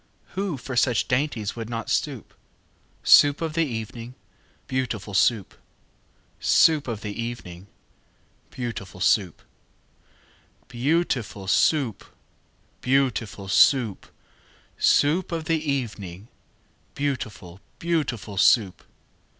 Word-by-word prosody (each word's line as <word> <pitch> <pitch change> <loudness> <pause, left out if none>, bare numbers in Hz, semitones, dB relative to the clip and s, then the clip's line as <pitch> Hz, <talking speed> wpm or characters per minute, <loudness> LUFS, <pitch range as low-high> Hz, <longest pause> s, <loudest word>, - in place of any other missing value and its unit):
Who 190 -6 -3
for 130 +1 -7
such 120 0 +2
dainties 125 -6 -1
would 115 -1 -6
not 115 -1 -4
stoop? - - -2 0.7
Soup 145 0 +6
of 160 -2 -3
the 165 -1 +1
evening, 115 +1 -6 0.5
beautiful 120 -6 -3
Soup! 100 +1 +2 0.9
Soup 155 -4 +4
of 115 -3 -4
the 105 -1 -5
evening, 100 -6 -7 0.8
beautiful 115 -7 -6
Soup! 95 -3 +1 1.3
Beau 140 +8 +1
ootiful 105 - -4
Soo 140 - +3
oop! 105 - -14 0.8
Beau 135 0 +3
ootiful 105 -4 -7
Soo 120 +4 +5
oop! 95 - -17 0.7
Soo 145 +3 +4
oop 190 - -11
of 165 -2 -3
the 165 0 +1
e 150 -2 -2
e 140 -2 +1
evening, 100 -2 -10 0.7
Beautiful, 105 -10 -4 0.2
beautiful 135 - -2
Soup! 100 -2 +3
120 Hz, 115 wpm, -24 LUFS, 105-145 Hz, 1.3 s, Soup